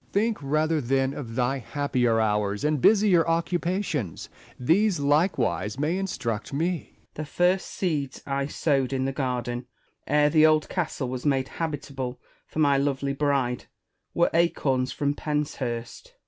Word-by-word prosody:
Essex. - - -34
Think 220 +2 +1
rather, 155 +2 +1
then, 135 +1 +1
of 115 -6 -7
thy 130 +2 +1
happier 125 -4 0
hours 105 -2 0
and 150 -2 +1
busier 200 - +5
occupations; 170 - -1 0.3
these 180 - +3
likewise 140 - +1
may 150 +5 0
instruct 120 - -3
me. 165 +4 -2
Spenser. - - -34
The 155 - -5
first 180 +5 +1
seeds 150 -8 -2
I 140 0 -1
sowed 140 -3 0
in 130 0 0
the 135 - 0
garden, 125 -2 -3 0.4
ere 150 0 +3
the 155 0 +5
old 155 -1 +3
castle 160 -7 -2
was 125 0 -4
made 135 -3 +1
habitable 140 -5 -4 0.3
for - - -11
my 140 -3 +4
lovely 140 0 0
bride, 140 -4 0 0.5
were 170 - +3
acorns 135 -6 +1
from 145 0 0
Penshurst. 145 - -4
140 Hz, 145 wpm, -26 LUFS, 130-160 Hz, 0.5 s, busier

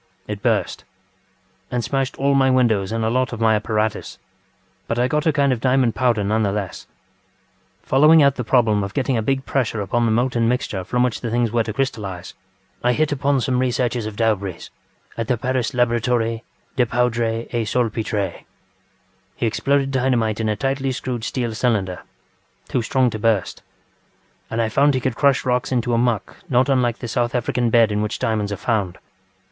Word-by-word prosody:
It - - -5
burst, - - 0 0.9
and 125 -1 -2
smashed 135 +2 -2
all 140 +1 +2
my 135 -1 +4
windows 115 -7 +2
and 115 0 -1
a - - +1
lot 130 -1 0
of 115 - -5
my 110 -1 +3
apparatus; 105 -3 -1 0.7
but 115 - -2
I 125 +1 +2
got 150 +4 0
a - - +5
kind 140 -2 +2
of 115 - -4
diamond 130 -3 +2
powder 120 -2 +1
nevertheless. 105 -2 -2 1.0
Following 150 +3 +5
out 140 -1 +4
the 125 - -4
problem 110 -4 +2
of 100 0 -6
getting 135 -1 0
a 115 - +1
big 135 +4 -1
pressure 120 -5 -1
upon 115 +4 0
the 115 - +1
molten 120 0 +1
mixture 115 -6 -1
from 125 +6 0
which 125 -3 -1
the 120 - -3
things 120 -1 0
were 120 0 +2
to 110 - -3
crystallise, 100 -8 -4 0.5
I 120 0 +3
hit 155 +3 0
upon 140 -1 +1
some 125 -1 0
researches 125 -2 0
of 110 - -7
DaubreeŌĆÖs 100 -6 -1 0.5
at 115 - -2
the 125 - +1
Paris 130 0 -1
Laboratorie 120 -1 +1 0.3
des 125 -2 +2
Poudres 115 -1 0
et 115 -2 -1
Salpetres. 105 -5 -1 0.9
He - - -2
exploded 135 +4 +1
dynamite 125 -5 +1
in 110 -1 0
a 105 - 0
tightly 135 +4 -1
screwed 125 -3 -4
steel 120 -1 -2
cylinder, 105 -6 -1 0.7
too 125 - -1
strong 125 +2 +1
to 110 - -5
burst, 105 -3 0 0.9
and 115 0 0
I - - 0
found 140 +5 +3
he - - +1
could 130 -1 -2
crush 140 -1 +2
rocks 125 0 0
into 120 -1 0
a 115 - +2
muck 120 -4 -1
not 130 +2 +2
unlike 125 -3 +2
the 120 - -6
South 120 +1 -1
African 120 0 0
bed 115 -1 +4
in 105 0 0
which 105 +1 -2
diamonds 105 -2 -1
are 100 - -3
found. 100 -4 -1
120 Hz, 185 wpm, -21 LUFS, 110-130 Hz, 1.0 s, a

